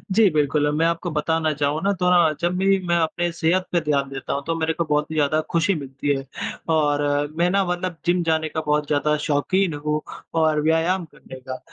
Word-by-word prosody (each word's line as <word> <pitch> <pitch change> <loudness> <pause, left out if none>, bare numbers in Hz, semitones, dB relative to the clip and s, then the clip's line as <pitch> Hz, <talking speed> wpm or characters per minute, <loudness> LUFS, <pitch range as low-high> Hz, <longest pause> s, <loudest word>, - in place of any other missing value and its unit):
जी 220 -3 +6
बिल्कुल। 150 0 +2
मैं 160 +2 +2
आपको 170 +1 -1
बताना 160 +1 0
चाहूँ 145 +1 -1
ना 200 - +2
थोड़ा 175 -3 +4
जब 175 +1 0
भी 195 +1 +3
मैं 170 - +2
अपने 170 +1 0
सेहत 175 +2 +1
पे 175 - +2
ध्यान 140 -3 0
देता 135 -1 -5
हूँ 140 - -3
तो 165 - 0
मेरे 160 0 0
को 170 - -1
बहुत 150 0 0
ही - - -4
ज़्यादा 155 +1 +2
खुशी 170 +3 +2
मिलती 140 -1 -2
है। 135 - -7 0.5
और 145 -2 +2 0.4
मैं 175 +1 +3
ना 195 +1 +2
मतलब 180 -1 -3
जिम 175 0 +2
जाने 160 -1 0
का 160 - -3
बहुत 150 0 +1
ज़्यादा 150 +1 +1
शौक़ीन 170 +5 +1
हूँ 150 +1 -2 0.4
और 155 -1 +2
व्यायाम 165 +3 +1
करने 130 - -11
का, 130 0 -7
160 Hz, 210 wpm, -22 LUFS, 150-175 Hz, 0.5 s, जी